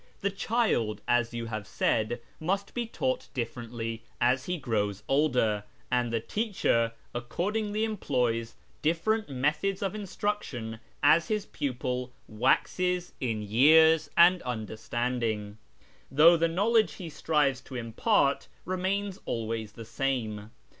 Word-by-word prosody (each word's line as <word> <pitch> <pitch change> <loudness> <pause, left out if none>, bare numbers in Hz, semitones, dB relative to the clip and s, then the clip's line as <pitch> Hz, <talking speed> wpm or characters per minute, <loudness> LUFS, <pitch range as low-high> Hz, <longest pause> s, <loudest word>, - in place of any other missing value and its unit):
The 200 - 0
child, 195 - 0
as 120 -1 +2
you 115 -1 -4
have 110 -3 -5
said, 115 +2 0 0.2
must 195 +5 -1
be 240 -2 -2
taught 130 - -2
dif 115 -2 -2
'erently 115 -1 -5 0.2
as 125 +2 +2
he 180 0 -2
grows 105 - -1
older, 125 -8 +2 0.3
and 120 -1 +1
the 115 - +1
teacher 115 - 0 0.2
accordingly 205 - -2
employs 120 - -1 0.3
lifferent 170 +7 +1
methods 150 +9 0
of 195 - -1
instruction 195 - -3 0.2
as 160 +4 +5
his 215 -2 -1
pupil 125 -2 -3 0.2
waxes 180 +10 +1
in 115 -5 -1
years 155 +8 +5
nd 175 +1 +7
understanding, 110 -2 -3 0.5
though 155 +6 +7
the 165 0 +2
knowledge 215 +6 +2
he 180 - -8
strives 150 -4 +1
to 130 - -11
impart 140 - +1 0.2
('mains 190 +2 -1
always 110 -2 -3
the 115 - -9
same. 115 -4 -2
130 Hz, 125 wpm, -29 LUFS, 115-180 Hz, 0.5 s, nd